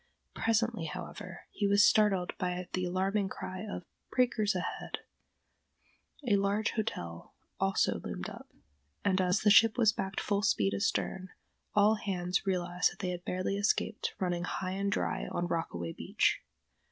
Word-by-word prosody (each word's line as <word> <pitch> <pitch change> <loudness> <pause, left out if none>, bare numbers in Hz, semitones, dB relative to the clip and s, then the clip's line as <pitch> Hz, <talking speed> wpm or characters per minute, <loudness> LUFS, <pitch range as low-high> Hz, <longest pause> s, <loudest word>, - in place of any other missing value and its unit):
Presently, 225 -4 +1
however, 150 - -7
he 205 - 0
was 200 +1 +6
startled 195 -4 +3
by 180 0 -2
the 185 0 0
alarming 190 +2 0
cry 185 0 -6
of 200 -4 -6 0.3
breakers 230 -5 +2
ahead! 180 - -3 1.3
A 205 -3 +4
large 200 +2 +1
hotel 85 - -4 0.2
also 195 0 +2
loomed - - -5
up, - - -10 0.6
and, 190 -1 +3
as 180 +1 +2
the 210 - +5
ship 225 +2 +7
was 225 -4 +5
backed 190 0 -3
full 200 -1 0
speed 100 - +2
astern, 100 - -1 0.5
all 210 +1 +5
hands 185 -2 -1
realized 180 -1 +1
that - - -14
they 185 -2 -2
had 175 0 -5
barely 185 +2 -1
escaped 205 +1 0
running 175 -2 0
high 185 0 -3
and 200 +1 -1
dry - - -1
on 175 - -2
Rockaway 85 - -3
Beach. - - +1
190 Hz, 150 wpm, -31 LUFS, 180-205 Hz, 1.3 s, ship